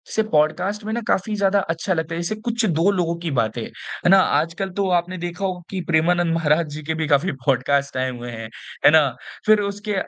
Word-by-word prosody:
से 220 - +3
पॉडकास्ट 160 +8 +1
में 220 - -3
ना 235 - -2
काफ़ी 210 +1 0
ज़्यादा 200 0 +2
अच्छा 165 +3 -1
लगता 165 -1 -3
है, 170 - -3
जैसे 170 +5 -2
कुछ 230 +1 -2
2 170 0 +2
लोगों 175 -3 0
की 170 -2 -3
बातें 115 -2 0
हैं - - -4
ना? 195 - +8
आजकल 170 +3 0
तो 195 - +1
आपने 180 +2 -7
देखा 175 +3 -4
होगा 185 -2 -3
कि 190 -2 -3
प्रेमानंद 170 +1 +2
महाराज 160 0 +2
जी 155 +1 -7
के 160 +2 -2
भी 160 -1 -2
काफ़ी 150 +6 +2
पॉडकास्ट 140 +1 +1
आए 130 0 0
हुए 120 -1 -7
हैं। 115 -1 -7 0.4
है - - +9
ना? 155 -2 +6 0.4
फिर 215 0 +5
उसके 205 +1 -3
170 Hz, 220 wpm, -22 LUFS, 155-195 Hz, 0.4 s, है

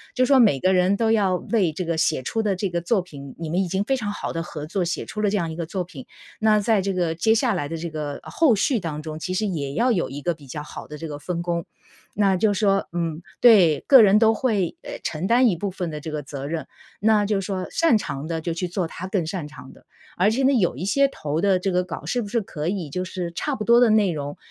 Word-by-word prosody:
就 255 - +3
是 - - -3
说 275 0 +5
每 210 - +4
个 185 +7 +2
人 185 +2 +3
都 225 0 +2
要 200 -4 +2
为 190 -2 0
这 175 +4 -4
个 165 -1 -1
写 155 -4 +1
出 225 - -1
的 205 -3 0
这 195 +2 -2
个 170 0 -1
作 195 +4 +1
品 140 -6 -11
你 165 - -5
们 180 +3 +1
已 190 - -1
经 190 +3 -1
非 270 +6 0
常 210 -5 -3
好 - - -5
地 165 - -2
合 155 -3 -7
作， 180 +4 -2
写 175 0 -3
出 210 - -5
了 210 - +2
这 205 - 0
样 165 -3 -2
一 - - -6
个 165 -1 -4
作 185 +2 -3
品。 160 -7 -11 0.3
那 215 -1 +4
在 210 0 +2
这 195 +1 -1
个 175 -3 0
接 220 +7 +2
下 235 0 +2
来 145 -6 -3
的 165 - -4
这 165 +1 -5
个 150 -2 -4
后 305 -9 +2
续 225 +5 +1
当 155 -5 -5
中， 155 0 -6
其 185 +3 -3
实 215 +3 0
也 145 -8 -3
要 245 +7 +2
有 185 -7 0
一 140 +2 -7
个 175 - +1
比 150 -3 -16
较 145 +3 -6
好 - - -9
的 150 - -8
这 160 - -6
个 145 -1 -7
分 170 +3 -4
工。 170 -1 -2 0.5
那 195 -2 +2
就 205 +3 +2
是 195 - -3
说， 195 -2 +2
嗯， 170 -2 -3 0.2
对， 190 -11 +6
个 265 -3 +9
人 210 0 +6
都 225 0 +5
会， 210 -7 0
哎 - - -8
承 160 +4 -3
担 245 +3 +5
一 200 - +2
部 195 +4 -3
分 180 -2 -4
的 150 -1 -6
这 160 - -6
个 150 -1 -3
责 140 -1 -7
任。 155 -1 -4 0.3
那 210 -1 +3
就 205 -1 0
是 195 - -5
说 185 -2 -3
擅 330 -9 +3
长 145 -7 -5
的 165 -1 -3
就 170 +1 -2
去 175 +2 -3
做 175 +1 -2
他 170 +3 -7
更 190 -3 -1
擅 165 -2 -4
长 150 - -12
的， - - -20 0.3
而 185 +4 +4
且 245 +5 0
呢， 265 - +5
有 190 - +2
一 145 - -6
些 275 +8 +3
投 150 - -4
的 195 +1 +3
这 190 +1 -1
个 180 0 +1
稿 175 - -7
是 245 - -1
不 210 - -5
是 230 +3 0
可 155 -6 -5
以 180 -4 -2
就 180 +6 -3
是 180 -2 -5
差 285 - -2
不 215 - -4
多 235 +2 +5
的 245 -2 +5
内 215 -3 +3
容， 145 -2 -5
185 Hz, 310 characters per minute, -23 LUFS, 160-210 Hz, 0.5 s, 个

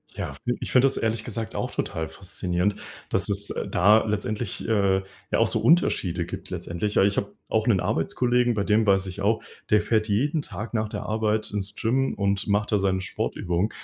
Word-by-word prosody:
Ja, - - -4
fi 120 0 -3
ich - - -4
finde 130 +1 +5
das 135 - -1
ehrlich 110 0 0
gesagt 115 -1 -4
auch - - -2
total 80 0 -3
faszinierend, 90 +2 -1 0.3
dass - - 0
es, 100 0 +1
äh, - - -3
da 105 +5 +5
letztendlich, 105 +2 -3
äh, 100 -3 +2 0.3
ja - - +2
auch - - +4
so - - 0
Unterschiede 90 - +2
gibt - - -8
letztendlich. 100 +5 -3
Ja, - - +5
ich 100 0 +2
habe 100 - -2
auch 110 +1 0
'nen 100 -6 +4
Arbeitskollegen, 120 +9 +1
bei 100 - 0
dem 110 +1 +3
weiß 95 0 +4
ich 95 +2 -6
auch, 110 +3 +1 0.3
der 105 0 +5
fährt 110 -1 +1
jeden 145 +9 +1
Tag 115 -4 -7
nach 110 -1 0
der - - -5
Arbeit 110 0 0
ins 105 0 -4
Gym 130 +4 +1
und 100 0 0
macht 105 +2 +1
da 105 - +3
seine 95 -1 +1
Sportübungen. 90 +1 -2
105 Hz, 205 wpm, -25 LUFS, 95-110 Hz, 0.3 s, finde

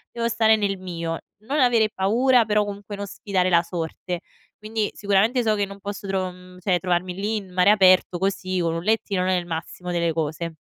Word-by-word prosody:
io 235 - -7
devo 230 - +2
stare 220 -1 +4
nel 200 -2 -1
mio. 170 -3 -4 0.3
Non 295 +2 0
avere 235 -4 +4
paura, 230 +5 +3
però 210 -1 +2
comunque 205 0 -7
non 200 0 -5
sfidare 185 -2 -1
la 170 -1 +4
sorte. 170 +1 -4 0.4
Quindi, 215 0 -2
sicuramente 205 +5 +2
so 220 -2 +2
che 205 -1 0
non 200 0 -11
posso 200 0 -6
tro 190 -1 -1
mhmm, 180 0 -15
cioè 185 0 +1
trovarmi 180 0 -1
lì 210 +3 -1
in 195 -3 -8
mare 180 +3 +4
aperto 185 -3 +4
così 185 -1 -1
con 165 -1 0
un 165 - -4
lettino 205 -3 0
non 185 +1 +1
è 185 - +3
il 175 -1 -4
massimo 170 +2 -6
delle 170 -2 0
cose. 160 +1 -3
190 Hz, 215 wpm, -23 LUFS, 180-210 Hz, 0.4 s, stare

